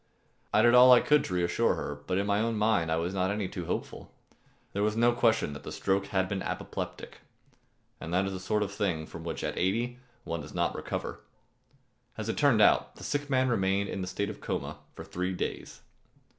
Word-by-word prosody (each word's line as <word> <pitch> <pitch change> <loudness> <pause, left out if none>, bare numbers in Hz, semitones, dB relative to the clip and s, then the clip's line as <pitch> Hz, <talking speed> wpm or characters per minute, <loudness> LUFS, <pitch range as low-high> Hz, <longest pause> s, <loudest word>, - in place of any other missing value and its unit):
I 110 - +4
did 120 0 +6
all 125 +1 +9
I 125 - +9
could 150 -1 +3
to 90 - -3
reassure 85 -1 +2
her, 75 0 -5
but 90 - 0
in 100 - +1
my 100 0 +1
own 115 +1 0
mind 105 -6 +2
I - - +3
was 85 +3 -2
not 95 -1 0
any 100 -1 -1
too 90 -2 -6
hopeful. - - -4 0.6
There 100 - -1
was 105 +1 +1
no 120 +1 +5
question 115 -9 +2
that 75 - -8
the - - -8
stroke 95 0 0
had 95 -2 0
been 95 0 -3
apoplectic, - - -5 0.8
and 80 - -7
that 90 +2 +2
is 95 - -2
the 95 - -5
sort 105 +3 0
of 100 - -4
thing 90 -6 -1
from 80 +1 -9
which 80 -2 -4
at - - -2
eighty 120 +7 0 0.2
one 85 -2 -4
does 75 - -11
not - - +1
recover. - - -4 1.0
As - - -4
it - - -2
turned - - +5
out, - - +3
the - - -12
sick 145 0 -2
man 130 -1 +2
remained 100 -3 +1
in 95 - -3
a - - -4
state 100 +3 -2
of 105 - -12
coma - - -4 0.2
for - - -8
three 90 +1 -3
days. 90 - -5
100 Hz, 220 wpm, -29 LUFS, 90-110 Hz, 1.0 s, all